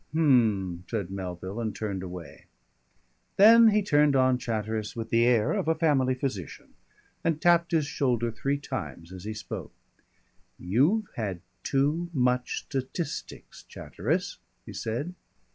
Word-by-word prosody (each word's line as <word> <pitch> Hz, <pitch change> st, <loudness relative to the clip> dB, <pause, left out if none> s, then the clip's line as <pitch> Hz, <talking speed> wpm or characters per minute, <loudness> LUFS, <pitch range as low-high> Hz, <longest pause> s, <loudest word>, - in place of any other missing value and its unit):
"H'm," 110 Hz, -, +2 dB
said 100 Hz, -6 st, -3 dB
Melville, 95 Hz, +2 st, -5 dB
and 110 Hz, -3 st, -3 dB
turned 100 Hz, -4 st, -3 dB
away. 90 Hz, -2 st, -9 dB, 0.9 s
Then 225 Hz, +3 st, +8 dB
he 210 Hz, -1 st, +3 dB
turned 150 Hz, -6 st, +3 dB
on 130 Hz, -1 st, +3 dB
Chatteris 110 Hz, -2 st, -3 dB
with 115 Hz, -1 st, -5 dB
the 115 Hz, +1 st, +4 dB
air 115 Hz, -3 st, +3 dB
of -, -, -1 dB
a 160 Hz, -, +3 dB
family 140 Hz, -5 st, +2 dB
physician, 125 Hz, -, -5 dB, 0.5 s
and 165 Hz, -2 st, 0 dB
tapped 170 Hz, +1 st, +3 dB
his 160 Hz, -3 st, +2 dB
shoulder 120 Hz, -5 st, 0 dB
three 140 Hz, +5 st, -1 dB
times 120 Hz, -, -6 dB
as 95 Hz, +1 st, -9 dB
he 110 Hz, 0 st, -4 dB
spoke. -, -, -7 dB, 0.8 s
"You've 145 Hz, -, +2 dB
had 100 Hz, -6 st, -3 dB, 0.2 s
too 150 Hz, +5 st, 0 dB
much 125 Hz, -1 st, 0 dB
statistics, 140 Hz, +4 st, -5 dB
Chatteris," -, -, -3 dB, 0.3 s
he -, -, -9 dB
said. 130 Hz, +11 st, -3 dB
125 Hz, 135 wpm, -27 LUFS, 105-150 Hz, 0.9 s, Then